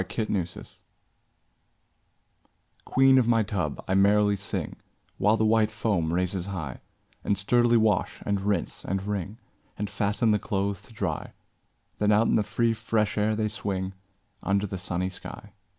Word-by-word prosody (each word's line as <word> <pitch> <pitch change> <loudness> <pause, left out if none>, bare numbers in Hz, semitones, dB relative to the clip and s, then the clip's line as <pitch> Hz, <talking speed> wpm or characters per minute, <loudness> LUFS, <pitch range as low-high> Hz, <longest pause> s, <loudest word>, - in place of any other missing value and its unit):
8 105 +4 -3
Autoplay 90 -3 -4 2.1
Queen 135 0 +5
of 120 - +1
my 115 -2 +4
tub, 90 -8 -3
I 95 - 0
merrily 100 +1 +4
sing, 100 0 -3 0.4
While 105 +3 +4
the 110 - +2
white 110 -1 +3
foam 105 -7 -1
raises 90 +1 0
high, 80 -10 -5 0.4
And 100 - +1
sturdily 120 +4 +3
wash, 110 -4 +1
and 100 -1 0
rinse, 100 +1 -2
and 95 +1 -2
wring, 100 0 -3 0.4
And 105 0 -3
fasten 105 +3 +1
the 105 - +2
clothes 100 0 -2
to - - -17
dry; 95 -8 -3 0.7
Then 105 0 +3
out 105 +2 +4
in - - +2
the 110 - +4
free 115 +3 +1
fresh 110 -1 0
air 110 +1 +1
they 110 0 0
swing, 95 -3 -3 0.5
Under 100 +2 +1
the 95 -1 -5
sunny 90 0 -2
sky. - - -10
105 Hz, 155 wpm, -27 LUFS, 95-110 Hz, 2.1 s, Queen